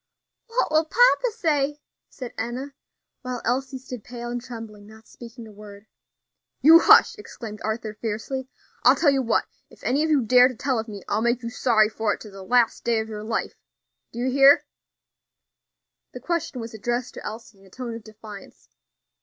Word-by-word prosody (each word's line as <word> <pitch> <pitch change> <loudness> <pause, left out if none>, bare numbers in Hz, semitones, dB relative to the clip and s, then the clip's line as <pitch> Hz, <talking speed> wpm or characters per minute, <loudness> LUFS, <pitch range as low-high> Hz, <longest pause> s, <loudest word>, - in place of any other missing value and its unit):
"What 465 -7 -1
will 315 +1 +3
papa - - +4
say?" 295 -8 -1 0.3
said 250 -3 -9
Enna; 250 +5 -5 0.5
while 250 -2 -5
Elsie 265 +2 -1
stood 250 -3 -9
pale 240 0 -7
and 245 0 -4
trembling, 225 -4 -10
not 220 +1 -16
speaking 235 0 -12
a 220 - -13
word. 205 0 -13 0.7
"You 320 +5 +8
hush!" - - +6
exclaimed 220 - -9
Arthur 220 0 -3
fiercely. 225 +5 -4 0.3
"I'll - - +6
tell 290 - +3
you 270 -1 +1
what, 230 -3 +1 0.2
if - - -20
any 275 +5 +1
of 315 - 0
you 290 -5 +3
dare 250 +2 +6
to 255 - -7
tell 260 -1 -1
of 220 - -5
me, 205 -3 -9
I'll 215 - 0
make 235 +1 0
you 235 - -4
sorry 225 -3 +3
for 215 -1 -1
it - - -20
to 210 - -11
the 195 0 -11
last 235 +3 +1
day 235 -1 +1
of 220 0 -5
your 210 -1 -6
life. 225 +1 -3 0.6
Do - - -12
you 255 +2 -1
hear?" 275 +2 +6 1.5
The - - -7
question 340 -7 -3
was 230 -1 -7
addressed 240 +3 -3
to - - -9
Elsie 220 -2 -9
in 195 - -20
a - - -19
tone 245 +3 -6
of 230 -1 -8
defiance. 215 -2 -13
240 Hz, 190 wpm, -24 LUFS, 220-265 Hz, 1.5 s, You